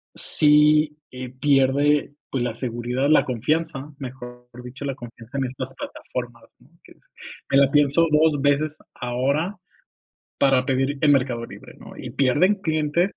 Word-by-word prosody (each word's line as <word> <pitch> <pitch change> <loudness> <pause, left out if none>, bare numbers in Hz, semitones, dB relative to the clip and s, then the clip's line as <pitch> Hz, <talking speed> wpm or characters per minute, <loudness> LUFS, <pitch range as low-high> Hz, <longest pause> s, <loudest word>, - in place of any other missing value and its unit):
sí, 150 0 +3
eh, 125 -1 -7
pierde, 140 +2 +2 0.2
pues, 130 -3 -1
la 120 -2 -2
seguridad, 120 +3 -2
la 155 - +5
confianza, 140 +3 -2
mejor 125 -2 -9 0.2
dicho, 125 +3 -8
la 135 -2 -3
confianza 120 +2 -10
en 135 - 0
estas 130 +1 -6
plataformas, 120 -2 -7 0.2
¿no? - - -23
Que - - -17
es, - - -31 0.5
me 135 - +3
la 140 -1 +4
pienso 145 +2 +4
2 150 -1 +3
veces 145 +2 +1 0.2
ahora 140 +9 -1 0.8
para 135 -2 +3
pedir 135 +1 0
en 145 -2 +5
Mercado 125 -3 0
Libre, - - -13
¿no? - - -13
Y - - -7
pierden 145 +10 +2
clientes 160 +1 0
135 Hz, 150 wpm, -23 LUFS, 125-150 Hz, 0.8 s, la